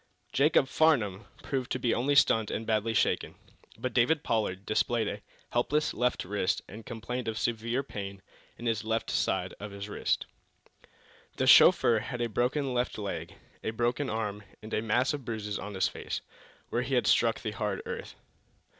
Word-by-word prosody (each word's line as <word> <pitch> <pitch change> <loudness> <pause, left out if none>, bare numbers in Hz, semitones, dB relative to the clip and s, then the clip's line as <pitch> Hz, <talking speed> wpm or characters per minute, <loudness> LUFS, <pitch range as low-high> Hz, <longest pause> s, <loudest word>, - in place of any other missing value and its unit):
Jacob 140 -1 +4
Farnum 115 -11 +2 0.2
proved 130 -3 -2
to - - +1
be 120 -2 +1
only 140 +4 +1
stunned 115 -6 +4
and 115 - -3
badly 110 0 0
shaken. - - +1 0.4
But 130 -1 -3
David 140 +6 +3
Pollard 100 -4 -1
displayed 110 +1 +1
a 105 0 -4 0.3
helpless 150 +5 +1
left 125 -5 0
wrist 100 0 0
and 110 +3 -10
complained 120 +2 -4
of 110 -1 -2
severe 115 +3 -1
pain 100 -6 -7 0.3
in 120 - -8
the 115 - +3
left 110 +1 -1
side - - 0
of 105 - -6
his 100 0 -7
chest. 105 - -1 1.1
The - - 0
chauffeur 115 -2 +7
had 125 +3 -5
a 120 -1 0
broken 130 +4 0
left 125 0 -1
leg, 100 -2 -5 0.3
a - - -1
broken 120 +5 0
arm, 105 -2 -2 0.2
and 110 - -8
a - - +1
mass 120 +5 +2
of 145 -2 -4
bruises 105 -3 -4
on 100 0 -6
his 95 - +2
face, - - -5 0.5
where 120 - 0
he 130 +2 -1
had 125 - +2
struck 115 -1 +3
the 110 - -3
hard 105 -2 -3
earth. - - -6
115 Hz, 175 wpm, -29 LUFS, 105-125 Hz, 1.1 s, chauffeur